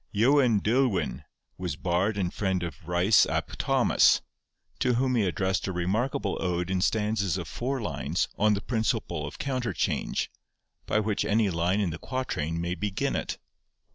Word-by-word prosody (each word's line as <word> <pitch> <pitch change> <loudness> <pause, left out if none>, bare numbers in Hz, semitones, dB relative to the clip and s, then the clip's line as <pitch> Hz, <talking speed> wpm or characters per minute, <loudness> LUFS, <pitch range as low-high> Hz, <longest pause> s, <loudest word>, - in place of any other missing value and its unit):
Ieuan 120 0 +4
Deulwyn 110 - +1 0.4
was 90 -5 -3
bard 95 +5 0
and 90 -2 -1
friend 95 -3 -1
of 80 -2 -7
Ryce 90 +4 +4
ap - - -2
Thomas, - - +4 0.6
to 125 -2 +2
whom 130 +1 +1
he 115 -5 +2
addressed 95 +1 0
a - - -1
remarkable 100 +4 -1
ode 90 0 -1
in 95 -1 +1
stanzas 105 -3 +1
of 85 -3 -5
four 130 +10 -2
lines 110 - -1
on 105 0 +3
the 100 - -3
principle 110 - -1
of - - -9
counter 130 -6 -2
change, 75 - -1 0.6
by 105 - +2
which 105 -1 0
any 105 -2 +2
line 85 +4 +1
in 95 -5 0
the 80 - -6
quatrain 85 - -3
may 85 +1 -1
begin 100 +1 -2
it. - - -3
100 Hz, 165 wpm, -27 LUFS, 90-110 Hz, 0.6 s, Ieuan